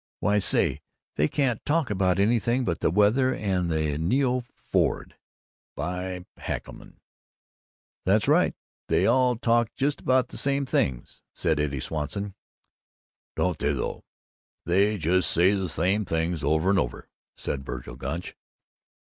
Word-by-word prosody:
Why, 105 0 +2
say, 75 -6 +2 0.3
they 75 - +2
can't 130 - 0
talk 155 -5 0
about 95 -2 +2
anything 120 +4 +2
but 85 - -1
the - - +2
weather 110 - +3
and 95 -4 -1
the 80 -2 0
ne 95 - +2
oo 130 -1 +1
Ford, - - -1 0.6
by 90 +3 -4
heckalorum!" - - -6 1.1
"That's - - +2
right. - - +3 0.3
They - - +2
all 125 +1 +3
talk 115 0 +2
about 115 - -37
just 140 +1 -1
the 130 0 +2
same 140 0 +1
things," 65 - -1
said 80 -2 +1
Eddie 70 -2 -1
Swanson. 80 +8 -3 1.0
"Don't 90 -5 0
they, 75 0 +1
though! 65 - -4 0.6
They 100 +5 +2
just 85 0 +2
say 90 +3 +4
the 95 -3 -1
same 95 +7 +1
things 80 -2 -1
over 80 +6 +2
and 100 - +3
over," - - -3 0.3
said 70 -1 -3
Vergil 60 -2 -7
Gunch. 85 +6 -5
95 Hz, 140 wpm, -26 LUFS, 80-120 Hz, 1.1 s, say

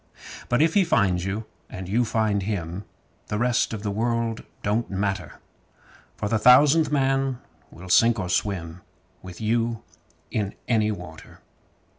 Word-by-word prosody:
But 120 +5 +3
if 160 0 +2
he 200 - +4
finds 95 - +1
you 100 +3 -3 0.2
and 95 -1 -7
you 115 +6 +1
find 110 -2 0
him, 95 -2 -4 0.4
The 105 - -2
rest 120 +1 +1
of 110 -2 -5
the 105 - -2
world 115 +1 -1 0.2
don't 110 +3 0
matter; 95 0 -2 0.8
For - - -2
the 110 +1 +1
Thousandth 145 +6 +6
Man 135 -2 +1 0.3
will 90 +3 -12
sink 115 +5 +4
or 95 -4 -3
swim 90 -2 -2 0.4
With 90 -1 -10
you 115 +1 -1 0.5
in 100 -2 -2
any 110 -3 +2
water. 90 -6 -9
110 Hz, 145 wpm, -24 LUFS, 95-120 Hz, 0.8 s, Thousandth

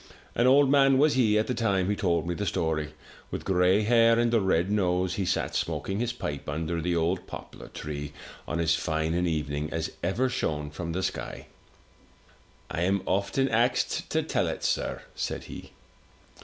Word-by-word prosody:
An 120 - +3
old 140 +2 +6
man 135 -1 +5
was 150 +2 +4
he 110 -5 +3
at 110 - +2
the 125 - -1
time 100 -6 +1
he 105 - +1
told 85 -4 0
me 90 - 0
the 105 +3 -3
story, 80 -4 -1 0.3
with - - -5
gray 95 +2 +3
hair 115 +1 +5
and 120 0 +2
a 115 - +4
red 95 0 +1
nose; 90 -3 +1
he 95 0 -1
sat - - -1
smoking 95 +1 -2
his 120 0 0
pipe 75 - -5
under 80 +3 -2
the 85 +1 0
old 85 +3 0
poplar - - -9
tree, 75 -1 -6 0.4
on 85 - -2
as 80 0 +3
fine 80 -1 -1
an 90 +1 +1
evening 75 -2 -2
as 80 0 -2
ever 105 +9 +1
shone 75 - -2
from 85 +2 -5
the 95 +2 -2
sky. - - -4 1.3
"I 85 - -2
am 95 +2 +1
often 100 +8 +1
axed 120 +2 +1
to - - +1
tell - - 0
it, - - -4
sir,*' - - -1
said - - -3
he. - - -9
95 Hz, 185 wpm, -27 LUFS, 80-115 Hz, 1.3 s, old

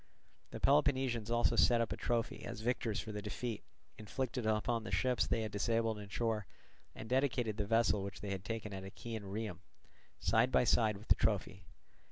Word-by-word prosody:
The - - -7
Peloponnesians 130 -6 +2
also 120 0 +2
set 120 +1 +5
up 115 - 0
a - - -1
trophy 115 -1 -1
as - - -6
victors 115 -2 0
for 110 - -5
the 105 0 -4
defeat 110 +2 -4 0.4
inflicted 120 +2 -3
upon 110 +2 +1
the - - -6
ships 125 -5 +1
they 115 - 0
had 110 - -4
disabled 115 +1 0
in 100 -1 -9
shore, 110 -2 -1 0.5
and 110 - -7
dedicated 125 -4 +1
the 105 -2 -1
vessel 115 -2 +3
which 100 +1 -6
they 100 - -5
had 95 -2 -3
taken 110 -1 -4
at 95 0 -5
Achaean 110 +2 -6
Rhium, 100 -2 -4 0.6
side - - +3
by - - +4
side 105 -2 +3
with 105 - -14
the - - +9
trophy. 100 -4 -1
110 Hz, 190 wpm, -35 LUFS, 105-120 Hz, 0.6 s, the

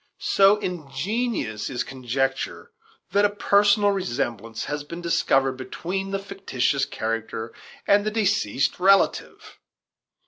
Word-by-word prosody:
So 195 +1 +4
ingenious 180 - -3
is 125 -1 -2
conjecture 135 - -3 0.4
that 205 - +3
a 205 - +5
personal 205 0 +3
resemblance 120 - -3
has 145 0 -4
been 170 +4 -8
discovered 135 -6 +1
between 185 +8 -4
the 195 - -1
fictitious 140 -10 -1
character 115 0 -4 0.3
and 205 0 +4
the 215 - 0
deceased 200 - 0
relative! 195 +2 +2
170 Hz, 110 wpm, -24 LUFS, 130-200 Hz, 0.4 s, a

